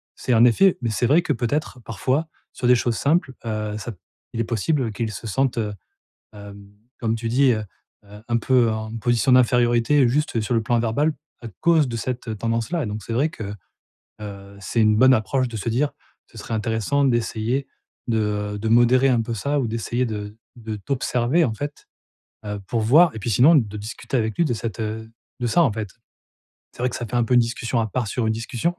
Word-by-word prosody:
C'est 125 - -1
en 115 0 +5
effet 170 - +5
mais 120 - -1
c'est 110 +2 0
vrai 150 +8 +4
que 165 - -3
peut-être, 125 +2 -2
parfois, 130 - -1 0.3
sur - - -5
des 125 - +6
choses 120 0 0
simples, 145 -2 +1
heu, 110 -1 -3
ça 110 +3 -6 0.4
il 115 - -4
est - - +2
possible 120 +3 -1
qu'ils 110 +1 -3
se 110 +3 -7
sentent, 135 +4 0
heu, 105 -2 -1 0.6
hem, 100 -1 -12 0.3
comme 115 -1 0
tu 115 0 -4
dis, 130 +2 +4
heu, 110 -2 -1 0.4
heu, 105 +1 -14
un 120 -1 +1
peu 120 0 +3
en 110 +1 -4
position 120 +3 +1
d'infériorité 125 +2 +4
juste 135 -2 0
sur 110 +3 -2
le 115 - +2
plan 120 +1 +1
verbal 130 +7 +1 0.3
à 120 - -7
cause 165 -4 +4
de 115 -1 -4
cette 120 -1 -4
tendance-là, 115 - -1
et - - -3
donc 105 0 -5
c'est 115 - -5
vrai 140 +7 +2
que, 105 -8 -7 0.7
heu, 100 -1 -9
c'est 110 +4 -1
une 110 -1 +4
bonne 130 +3 +6
approche 130 +3 0
de 115 - -7
se 110 - -4
dire: 135 +6 0 0.4
«Ce - - -14
serait 115 - -5
intéressant 110 +5 0
d'essayer 120 +1 0 0.4
de, 115 -1 +1 0.4
heu, - - -5
de 110 +2 -3
modérer 120 +3 +5
un 125 -3 +3
peu 115 +1 -4
ça 140 +7 -1
ou 125 - -1
d'essayer 115 +2 -1
de 105 -1 -6 0.2
de 110 -2 -6
t'observer 125 - 0
en 115 - -1
fait, 145 +5 -7 0.6
heu, 105 0 -4
pour 115 - -1
voir» 150 +11 +5
et - - -6
puis 115 - -3
sinon, 130 - +6
de 105 -7 0
discuter 110 +5 -5
avec 110 -1 -2
lui 170 - +2
de 125 - 0
cette, 115 -1 -5
heu, 110 +1 -4 0.3
de 120 - 0
ça 170 +9 +4
en 135 - +2
fait. 105 -2 -5 0.8
C'est - - -20
vrai 125 - +2
que - - -6
ça 120 - -4
fait 115 - -5
un 120 - +3
peu 125 - 0
une - - +7
discussion 120 +1 -2
à 110 - 0
part 120 +1 -2
sur 115 +3 -1
une 110 - +1
discussion, 120 +9 -2
115 Hz, 220 wpm, -22 LUFS, 110-130 Hz, 0.8 s, une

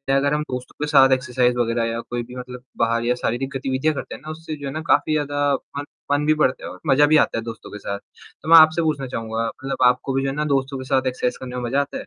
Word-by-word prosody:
अगर 140 +1 +2
हम 150 - +1
दोस्तों 125 0 -6
के - - -6
साथ 135 -3 +6
एक्सरसाइज़ 125 -1 +1
वगैरह 115 -1 0
या 115 - -3
कोई 120 0 -2
भी 125 +2 -12
मतलब 125 0 -8
बाहर 115 0 +1
या 125 +1 +2
शारीरिक 125 +2 -2
गतिविधियाँ 135 +3 0
करते - - -6
हैं - - -13
ना 155 - -9
उससे 160 0 -7
जो 145 -2 -7
है 135 - -5
ना, 155 - -4
काफ़ी 155 -1 +2
ज़्यादा 145 -1 +1
फ़न 140 +2 -7 0.3
फ़न 145 +1 +2
भी 155 - +4
बढ़ता 130 -3 +1
है - - -5
और - - -11
मज़ा 145 +1 +5
भी - - +8
आता 150 - +2
है 115 - -3
दोस्तों 115 -1 -8
के 105 - -7
साथ। 100 0 -4
तो 155 - -14
मैं 165 - +10
आपसे 160 +1 +6
पूछना 150 -4 -1
चाहूँगा, 115 -2 -3
मतलब 135 +4 -5
आपको 125 +2 +1
भी 135 - +1
जो 135 - 0
है 135 - -4
ना, 150 0 -1
दोस्तों 135 -1 0
के 130 - -6
साथ 130 0 +1
एक्सरसाइज़ 125 -1 -1
करने 125 -1 -7
में 125 - -3
मज़ा 125 +4 0
आता 140 - -3
है? - - -37
135 Hz, 285 wpm, -22 LUFS, 125-145 Hz, 0.3 s, मैं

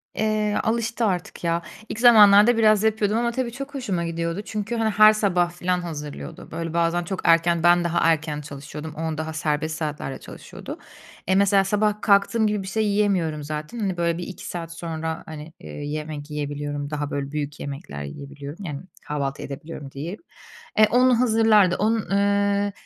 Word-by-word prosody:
Eee, 215 -1 0
alıştı 230 +1 0
artık, 180 -4 -3
ya, 170 0 +1 0.3
ilk 220 - -5
zamanlarda 220 -1 +7
biraz 215 -2 +4
yapıyordum 220 -1 +1
ama 235 0 +1
tabii 245 0 -2
çok 275 +4 -7
hoşuma 195 -10 -2
gidiyordu 170 +2 -3
çünkü, 215 +1 -3
hani, 225 -1 +1
her 215 0 +7
sabah 180 -5 +1
filan 180 +1 -1
hazırlıyordu. 150 -4 -7
Böyle 165 0 -4
bazen 170 +1 +1
çok 185 +2 -4
erken 165 0 +3
ben 175 0 +5
daha 170 0 0
erken 150 -2 -2
çalışıyordum, 150 +2 -8
on 160 -1 -3
daha 160 +1 -4
serbest 155 0 -1
saatlerde 150 -3 -4
çalışıyordu. - - -10 0.5
Eee, 190 - +3
mesela 195 0 +4
sabah 210 +1 0
kalktığım 205 +2 +3
gibi 210 -2 -1
bir - - -8
şey 215 +3 0
yiyemiyorum 190 -7 +1
zaten. 150 +9 -5
Hani, 195 -4 -1
böyle 170 -1 0
bir 175 - -5
2 190 - -9
saat 165 -1 -6
sonra, 160 -1 -4
hani, 155 0 -9
eee, - - -11
yemek 150 0 -5
yiyebiliyorum, 145 -1 -4
daha 145 -1 -3
böyle 140 -1 -3
büyük 150 -1 -4
yemekler 135 - -6
yiyebiliyorum, 140 - -8
yani, 145 -4 -5 0.3
kahvaltı 140 -2 -3
edebiliyorum 145 0 -8
diyeyim. 160 +9 -6 0.6
E, 215 - +7
onu 250 +1 +4
hazırlardı 220 -6 +4
onu, 220 +3 +2 0.2
ııı, 200 0 +2
175 Hz, 170 wpm, -23 LUFS, 150-210 Hz, 0.6 s, zamanlarda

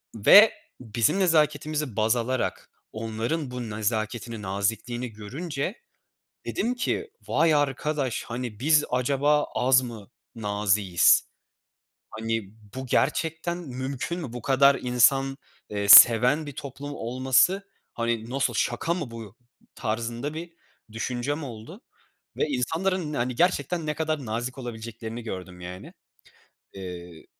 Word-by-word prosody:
ve 200 - +8 0.3
bizim 115 - 0
nezaketimizi 150 - +1
baz 110 +2 +2
alarak 125 +2 -2 0.2
onların 115 +7 -3
bu 125 -2 -5
nezaketini, 110 +1 -3
nazikliğini 110 +5 -2
görünce 140 - -5 0.7
dedim 245 +2 -1
ki 425 - -2 0.2
vay 165 -2 +3
arkadaş, 145 -2 -1
hani, 120 -3 -6
biz 150 +1 +4
acaba 140 +4 +2
az 130 +1 +4
mı 115 -4 -9 0.2
naziğiz? 100 -4 +2 0.9
Hani, 115 -3 -3 0.2
bu 130 0 -5
gerçekten 160 +6 0
mümkün 135 +1 -5
mü? 135 -9 -7
Bu 125 - -6
kadar 140 +2 +4
insan, 135 +2 +3 0.3
eee, 100 -1 -3
seven 125 +8 +8
bir 145 - -6
toplum 140 +1 -7
olması, 130 - +2 0.3
hani 115 -1 -2
nasıl, 130 -1 0
şaka 125 +9 0
mı 150 -9 -5
bu 115 -3 -9 0.4
tarzında 120 +6 -3
bir 170 +1 -7 0.4
düşüncem 125 +7 -3
oldu 125 - -9 0.6
ve - - +2
insanların, 160 +5 -1
hani, 125 -2 -2
gerçekten 175 -1 +1
ne 150 - -1
kadar 155 -3 -2
nazik 120 +4 -4
olabileceklerini 115 -1 -7
gördüm, 90 -4 -7
yani. 90 +1 -9 0.8
Eee 90 -3 -9
125 Hz, 115 wpm, -26 LUFS, 110-150 Hz, 0.9 s, ve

